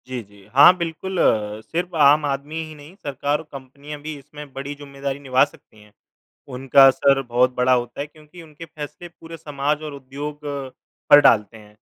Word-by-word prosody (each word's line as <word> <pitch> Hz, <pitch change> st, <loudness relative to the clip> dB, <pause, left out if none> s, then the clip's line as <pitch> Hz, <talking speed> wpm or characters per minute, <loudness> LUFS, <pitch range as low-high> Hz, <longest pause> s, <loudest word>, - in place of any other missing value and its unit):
जी, 130 Hz, -1 st, -5 dB
जी, 100 Hz, -1 st, -20 dB
हाँ 145 Hz, +7 st, +8 dB
बिल्कुल 170 Hz, +2 st, -4 dB
अ, 105 Hz, -4 st, +1 dB
सिर्फ़ 175 Hz, +8 st, -4 dB
आम 150 Hz, 0 st, +5 dB
आदमी 145 Hz, +3 st, -3 dB
ही 155 Hz, 0 st, -11 dB
नहीं, 150 Hz, +5 st, -14 dB
सरकार 145 Hz, -3 st, -2 dB
और -, -, -9 dB
कंपनियाँ 140 Hz, +2 st, -10 dB
भी 155 Hz, +1 st, -6 dB
इसमें 145 Hz, +1 st, -12 dB
बड़ी 135 Hz, +2 st, -6 dB
ज़िम्मेदारी 140 Hz, -1 st, -6 dB
निभा 130 Hz, -2 st, +3 dB
सकती 110 Hz, -6 st, -20 dB
हैं। 105 Hz, 0 st, -20 dB, 0.6 s
उनका 135 Hz, +1 st, +5 dB
असर 135 Hz, +1 st, +3 dB
बहुत 125 Hz, +1 st, +1 dB
बड़ा 125 Hz, +1 st, +3 dB
होता 120 Hz, -1 st, -2 dB
है, 145 Hz, -, -4 dB
क्योंकि 155 Hz, +3 st, -16 dB
उनके 155 Hz, +1 st, -12 dB
फैसले 150 Hz, +1 st, -9 dB
पूरे 165 Hz, -1 st, -12 dB
समाज 145 Hz, 0 st, -2 dB
और 150 Hz, -2 st, -6 dB
उद्योग 140 Hz, +2 st, -7 dB, 0.7 s
पर 145 Hz, -, +10 dB
डालते 110 Hz, -5 st, +3 dB
हैं। 105 Hz, -1 st, -18 dB
140 Hz, 180 wpm, -21 LUFS, 130-150 Hz, 0.7 s, पर